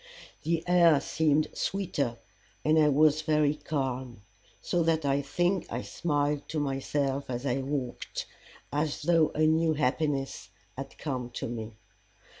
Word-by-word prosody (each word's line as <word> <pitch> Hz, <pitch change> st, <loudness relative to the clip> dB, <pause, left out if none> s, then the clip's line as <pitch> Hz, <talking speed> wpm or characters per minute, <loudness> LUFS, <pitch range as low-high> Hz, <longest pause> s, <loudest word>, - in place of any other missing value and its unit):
The 165 Hz, 0 st, 0 dB
air 170 Hz, -4 st, +5 dB
seemed 155 Hz, +1 st, +2 dB
sweeter, 150 Hz, -11 st, -1 dB, 0.5 s
and 155 Hz, +1 st, +5 dB
I 150 Hz, -1 st, +5 dB
was 155 Hz, +1 st, +4 dB
very 155 Hz, -2 st, +2 dB
calm, 130 Hz, -7 st, -3 dB, 0.4 s
so 175 Hz, -, 0 dB
that 160 Hz, -2 st, +1 dB
I 140 Hz, 0 st, +2 dB
think 175 Hz, +6 st, 0 dB
I -, -, -3 dB
smiled 145 Hz, -2 st, -1 dB
to 155 Hz, -, -1 dB
myself 140 Hz, 0 st, -1 dB
as 125 Hz, +1 st, -3 dB
I 135 Hz, 0 st, +1 dB
walked, 135 Hz, -2 st, -4 dB, 0.5 s
as 150 Hz, +1 st, -1 dB
though 165 Hz, -1 st, +4 dB
a 155 Hz, -, +3 dB
new 160 Hz, 0 st, +3 dB
happiness 140 Hz, 0 st, -1 dB, 0.3 s
had -, -, -7 dB
come 130 Hz, -4 st, -3 dB
to -, -, -3 dB
me. 115 Hz, -1 st, -5 dB
145 Hz, 140 wpm, -29 LUFS, 135-160 Hz, 0.5 s, air